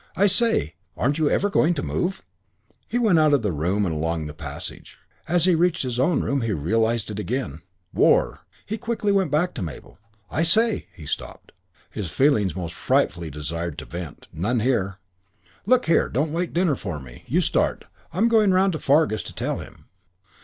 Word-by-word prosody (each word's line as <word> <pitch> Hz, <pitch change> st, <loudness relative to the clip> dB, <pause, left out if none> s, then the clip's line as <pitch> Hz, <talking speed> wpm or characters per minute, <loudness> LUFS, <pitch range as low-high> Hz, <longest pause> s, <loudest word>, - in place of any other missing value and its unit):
"I 200 Hz, -, +3 dB
say, 200 Hz, -, +3 dB, 0.2 s
aren't 140 Hz, +5 st, 0 dB
you 155 Hz, -2 st, +3 dB
ever 200 Hz, -, +2 dB
going 175 Hz, -4 st, +2 dB
to 140 Hz, -, -3 dB
move?" 190 Hz, +2 st, -2 dB, 0.6 s
He 235 Hz, -, -1 dB
went 215 Hz, -9 st, +4 dB
out 155 Hz, -2 st, +5 dB
of 130 Hz, -, -1 dB
the 105 Hz, -, 0 dB
room 90 Hz, +7 st, 0 dB
and 85 Hz, -, -1 dB
along 80 Hz, 0 st, -2 dB
the 75 Hz, -, -6 dB
passage. -, -, -6 dB, 0.3 s
As 175 Hz, +1 st, +3 dB
he 185 Hz, -, +4 dB
reached 170 Hz, -1 st, +2 dB
his 125 Hz, -2 st, -3 dB
own 145 Hz, +5 st, +2 dB
room 140 Hz, -1 st, 0 dB
he 115 Hz, -2 st, -1 dB
realised 110 Hz, +7 st, 0 dB
it 105 Hz, -, -5 dB
again. 105 Hz, -, -3 dB, 0.3 s
"War -, -, +3 dB
" -, -, -30 dB
He 220 Hz, -, -3 dB
went -, -, -21 dB
quickly 205 Hz, -5 st, +1 dB
back 155 Hz, +4 st, 0 dB
to -, -, -6 dB
Mabel. 80 Hz, +2 st, -8 dB, 0.3 s
"I 160 Hz, -, 0 dB
say 220 Hz, +6 st, +3 dB
" -, -, -32 dB
He 80 Hz, -, -10 dB
stopped. -, -, -6 dB, 0.4 s
His 100 Hz, -6 st, -4 dB
feelings 105 Hz, -, +2 dB
most 85 Hz, -3 st, -5 dB
frightfully 90 Hz, -, 0 dB
desired 80 Hz, +3 st, -5 dB
some -, -, -10 dB
vent. 85 Hz, -3 st, -7 dB
None 110 Hz, +8 st, 0 dB
here. 100 Hz, -6 st, 0 dB, 0.7 s
"Look 255 Hz, +2 st, +4 dB
here. 165 Hz, -, +3 dB
Don't 150 Hz, +4 st, -1 dB
wait 170 Hz, +1 st, -1 dB
dinner 170 Hz, -4 st, +2 dB
for 90 Hz, -10 st, -5 dB
me. 60 Hz, -3 st, -13 dB
You -, -, +2 dB
start. -, -, 0 dB, 0.3 s
I'm 195 Hz, +8 st, +2 dB
going 220 Hz, -3 st, +4 dB
round 190 Hz, 0 st, +3 dB
to 155 Hz, -, -3 dB
Fargus 140 Hz, -6 st, +2 dB
to -, -, -10 dB
tell -, -, -2 dB
him." -, -, -12 dB
135 Hz, 195 wpm, -23 LUFS, -, 0.7 s, out